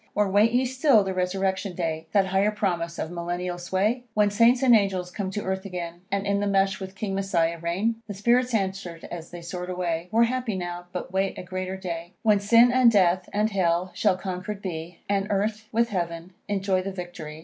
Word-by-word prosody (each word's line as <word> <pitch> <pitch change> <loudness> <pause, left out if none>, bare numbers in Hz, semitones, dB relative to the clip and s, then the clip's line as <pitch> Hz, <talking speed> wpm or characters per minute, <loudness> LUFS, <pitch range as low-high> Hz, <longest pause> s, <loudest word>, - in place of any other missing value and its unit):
Or 210 -1 +3
wait 210 +3 +4
ye 250 +2 +2
still 260 -3 +4
the 190 -1 -2
resurrection 190 +1 -1
day, 160 -2 -3
That 200 -2 +4
higher 195 +2 +2
promise 175 -5 -2
of 160 - -4
Millennial 175 +1 -3
sway? 200 +7 0
When 210 -1 +3
Saints 235 +4 +4
and 245 -3 +7
angels 190 -4 +1
come 195 0 -3
to 205 +2 -4
earth 190 0 -2
again, 175 -3 -6
And 200 0 0
in 200 0 +1
the 205 - 0
Mesh 195 -1 +2
with 190 0 -7
King 200 0 -3
Messiah 170 -4 0
reign? 200 +8 -1
The 205 - -6
spirits 240 +4 +2
answer'd 190 -4 -3
as 170 -1 -7
they 175 -1 -9
soar'd 180 +1 -5
away 175 -2 -2
"We're 230 +1 +5
happy 245 -2 -1
now, 175 -1 -5
but 180 0 -6
wait 190 0 0
a - - -6
greater 185 +1 -4
day, 175 -1 -6
When 210 -3 +4
sin 230 +4 +6
and 250 -2 +5
death, 185 -3 +3
and 210 +2 +1
hell, 180 -1 +1
shall 200 -4 +2
conquer'd 190 +2 -5
be, 165 -2 -5
And 200 0 0
earth, 215 +2 -1
with 235 +1 +2
heaven, 170 -2 -3 0.2
enjoy 195 -2 +1
the 195 +1 -4
victory." 175 -4 -7
190 Hz, 205 wpm, -25 LUFS, 175-210 Hz, 0.2 s, and